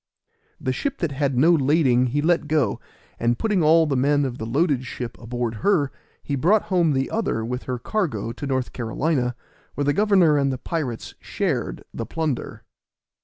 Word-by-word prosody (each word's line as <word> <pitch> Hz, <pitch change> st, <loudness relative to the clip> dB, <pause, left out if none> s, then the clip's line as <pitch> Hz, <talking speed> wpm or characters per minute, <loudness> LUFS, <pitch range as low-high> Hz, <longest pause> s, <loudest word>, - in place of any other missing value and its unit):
The 130 Hz, -, -1 dB
ship 280 Hz, -, -3 dB
that 170 Hz, -4 st, -2 dB
had 140 Hz, -2 st, -1 dB
no 160 Hz, +7 st, +5 dB
lading 135 Hz, -5 st, +3 dB
he 145 Hz, +4 st, -1 dB
let 170 Hz, -2 st, +2 dB
go, 150 Hz, -8 st, +1 dB, 0.4 s
and 120 Hz, 0 st, +1 dB
putting 210 Hz, -5 st, +1 dB
all 160 Hz, +1 st, +5 dB
the 145 Hz, -3 st, 0 dB
men 145 Hz, +2 st, +2 dB
of 125 Hz, -2 st, -4 dB
the 110 Hz, -, -4 dB
loaded 140 Hz, +1 st, +1 dB
ship 125 Hz, -2 st, -6 dB
aboard 120 Hz, -1 st, -3 dB
her, 170 Hz, -9 st, +2 dB, 0.3 s
he 140 Hz, -, -2 dB
brought 185 Hz, +10 st, +3 dB
home 175 Hz, -6 st, +2 dB
the 135 Hz, 0 st, -1 dB
other 200 Hz, -, -1 dB
with 125 Hz, +2 st, -4 dB
her 125 Hz, -1 st, -2 dB
cargo 120 Hz, -, -2 dB
to 140 Hz, +4 st, -6 dB
North 130 Hz, -2 st, -1 dB
Carolina, 125 Hz, +1 st, -1 dB, 0.4 s
where 145 Hz, -, -1 dB
the 145 Hz, -, +2 dB
governor 190 Hz, -7 st, +4 dB
and 140 Hz, -1 st, +1 dB
the 130 Hz, -, -3 dB
pirates 130 Hz, -5 st, -4 dB
shared -, -, -2 dB
the -, -, -5 dB
plunder. 155 Hz, -6 st, -3 dB
140 Hz, 180 wpm, -23 LUFS, 125-165 Hz, 0.4 s, no